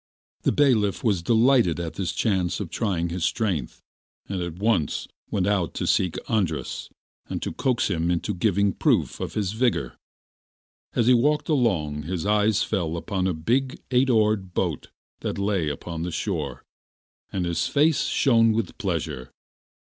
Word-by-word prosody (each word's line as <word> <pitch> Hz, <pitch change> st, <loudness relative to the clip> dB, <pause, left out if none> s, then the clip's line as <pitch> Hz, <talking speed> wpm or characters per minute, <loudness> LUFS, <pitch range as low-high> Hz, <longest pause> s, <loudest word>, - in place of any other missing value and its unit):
The -, -, +2 dB
bailiff 105 Hz, -, +2 dB
was 100 Hz, -6 st, +2 dB
delighted 115 Hz, -3 st, +3 dB
at 85 Hz, -2 st, -4 dB
this 95 Hz, -3 st, -2 dB
chance 95 Hz, -6 st, 0 dB
of 100 Hz, -6 st, -5 dB
trying 90 Hz, -7 st, -1 dB
his 85 Hz, 0 st, -3 dB
strength, 90 Hz, -, -1 dB, 0.4 s
and 95 Hz, -2 st, -3 dB
at 85 Hz, -2 st, -4 dB
once 100 Hz, -6 st, 0 dB, 0.2 s
went 95 Hz, -3 st, 0 dB
out 100 Hz, -6 st, 0 dB
to -, -, -2 dB
seek 90 Hz, -3 st, +1 dB
Andras 95 Hz, -9 st, -1 dB, 0.4 s
and -, -, -2 dB
to -, -, -3 dB
coax 125 Hz, -3 st, +1 dB
him 85 Hz, -3 st, 0 dB
into 90 Hz, +4 st, 0 dB
giving 100 Hz, +1 st, +1 dB
proof -, -, +1 dB
of -, -, -5 dB
his 100 Hz, -3 st, 0 dB
vigour. 120 Hz, +1 st, 0 dB, 1.0 s
As 120 Hz, -, +2 dB
he 125 Hz, -, +6 dB
walked 150 Hz, +7 st, +2 dB
along 90 Hz, -, +1 dB
his 85 Hz, +3 st, -4 dB
eyes 105 Hz, 0 st, +3 dB
fell 85 Hz, -6 st, -1 dB
upon 95 Hz, +1 st, -1 dB
a 95 Hz, -, 0 dB
big 125 Hz, +11 st, 0 dB
eight 130 Hz, +1 st, +3 dB
oared 105 Hz, -5 st, +2 dB
boat -, -, -1 dB, 0.3 s
that -, -, -3 dB
lay 100 Hz, -6 st, 0 dB
upon 80 Hz, +3 st, -5 dB
the 90 Hz, -, -2 dB
shore, 80 Hz, -, -3 dB, 0.7 s
and 90 Hz, -2 st, -1 dB
his 85 Hz, -1 st, 0 dB
face 150 Hz, +1 st, +3 dB
shone 115 Hz, -4 st, +4 dB
with 110 Hz, -2 st, -3 dB
pleasure. 80 Hz, -, -3 dB
100 Hz, 160 wpm, -25 LUFS, 85-115 Hz, 1.0 s, he